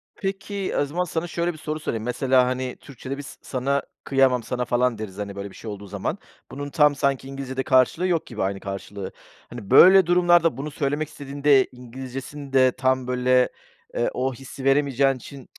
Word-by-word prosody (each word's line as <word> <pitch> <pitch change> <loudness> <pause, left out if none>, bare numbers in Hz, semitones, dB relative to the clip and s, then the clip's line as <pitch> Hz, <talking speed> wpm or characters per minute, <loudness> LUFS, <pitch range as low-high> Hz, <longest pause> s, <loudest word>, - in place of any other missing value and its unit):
Peki, 195 -1 -3
o 145 - +2
zaman 170 +6 -2
sana 170 -1 -3
şöyle 170 +1 -1
bir - - -12
soru 155 0 -4
sorayım, 115 -7 -3
mesela, 125 +1 +2
hani, 130 0 -2
Türkçe'de 135 0 -7
bir - - -5
s 140 - -10
sana 140 +2 -1 0.2
kıyamam 130 -3 +3
sana, 125 +1 -2
falan, 120 -1 +1
deriz, 105 -3 -7
hani, 100 -1 -5
böyle, 100 0 -5
bir - - -15
şey 110 - -7
olduğu 100 0 -8
zaman. - - -3 0.3
Bunun 145 +1 -5
tam 150 0 +4
sanki 135 -1 0
İngilizce'de 135 -1 -4
karşılığı 130 +8 +3
yok 165 -3 0
gibi, 110 -5 -4
aynı 95 0 -2
karşılığı. 100 0 -6 0.4
Hani, 115 -5 -9
böyle, 190 -1 +8
durumlarda, 175 -4 +4
bunu 150 +3 -5
söylemek 145 +2 -1
istediğinde 140 -1 +2
İngilizce'sinde 130 +2 -1
tam, 130 0 0
böyle, 125 0 +3 0.5
eee, 120 - +1
o 130 +1 -1
hissi 135 +2 -10
veremeyeceğin 135 -1 +3
için 130 +1 -11
135 Hz, 180 wpm, -24 LUFS, 125-145 Hz, 0.5 s, böyle